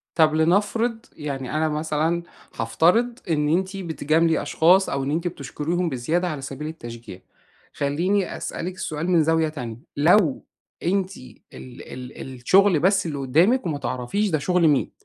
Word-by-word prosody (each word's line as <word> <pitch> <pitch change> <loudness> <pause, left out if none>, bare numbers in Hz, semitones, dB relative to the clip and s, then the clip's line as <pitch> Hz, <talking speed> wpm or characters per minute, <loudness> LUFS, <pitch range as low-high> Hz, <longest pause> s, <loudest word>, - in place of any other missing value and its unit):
طب 155 -2 +4
لنفرض 205 +8 +2 0.2
يعني 140 -4 -5
أنا 155 0 +1
مثلًا 155 +2 -1 0.3
هافترض 200 - +2
إن 150 -2 +1
أنتِ 190 +4 0
بتجاملي 165 -2 +1
أشخاص، 185 +4 +4
أو 140 -1 -1
إن 135 - -2
أنتِ 165 +4 -1
بتشكُريهم 170 +3 -3
بزيادة 160 +7 -1
على 150 -4 -4
سبيل 135 +3 -6
التشجيع. 115 - -9 0.5
خلّيني 175 +7 0
أسألِك 180 +2 -5
سؤال 160 +2 -3
من 170 -3 +4
زاوية 160 0 +2
تانية. 125 -7 -6 0.2
لو 160 0 +3 0.4
أنتِ 190 +1 0
ال 125 - -12 0.2
ال 125 0 -10 0.2
الشغل 185 +6 +4
بس 190 0 +2
اللي 145 -3 -3
قدامِك، 170 - +2
وما 155 -4 -2
تعرفيش 140 +11 -2
ده 155 - +1
شغل 170 +2 +2
مين. 145 -3 +1
160 Hz, 150 wpm, -23 LUFS, 145-180 Hz, 0.5 s, طب